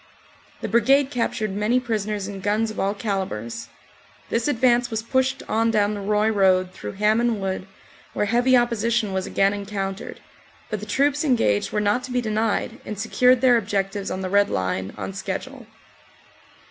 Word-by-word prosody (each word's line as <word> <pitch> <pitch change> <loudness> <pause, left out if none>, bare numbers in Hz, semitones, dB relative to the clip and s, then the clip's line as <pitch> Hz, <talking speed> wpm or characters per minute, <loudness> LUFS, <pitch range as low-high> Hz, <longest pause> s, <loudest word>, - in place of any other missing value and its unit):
The - - -2
Brigade 270 +5 +3
captured 220 -4 -1
many 210 +5 +1
prisoners 215 -4 -2
and 200 -1 -7
guns 215 +2 0
of 215 - -7
all 200 +1 0
calibres. 190 - -4 0.6
This 230 +3 0
advance 245 -2 +2
was 220 -1 -3
pushed 260 +3 0
on 225 +1 +1
down 210 -2 +2
the 205 - -5
Roye 210 +2 +1
road 185 -3 +3
through - - -7
Hamon 215 +3 +2
Wood, 190 0 -3 0.5
where - - 0
heavy 245 +4 +4
opposition 235 -3 +1
was 190 0 -2
again 195 +1 +2
encountered, 200 -1 -5 0.5
but 215 - -2
the 210 - -8
troops 285 +7 +1
engaged 230 - +1
were 210 - 0
not 210 +4 +1
to 255 - -9
be 250 - +1
denied 220 -1 -1
and 210 - -6
secured 250 +3 +3
their 250 -2 +5
objectives 200 -1 -2
on 185 - -3
the 185 - -3
Red 205 0 +4
Line 95 +1 -2
on 95 -2 -5
schedule. 95 - -6
210 Hz, 170 wpm, -23 LUFS, 195-240 Hz, 0.6 s, their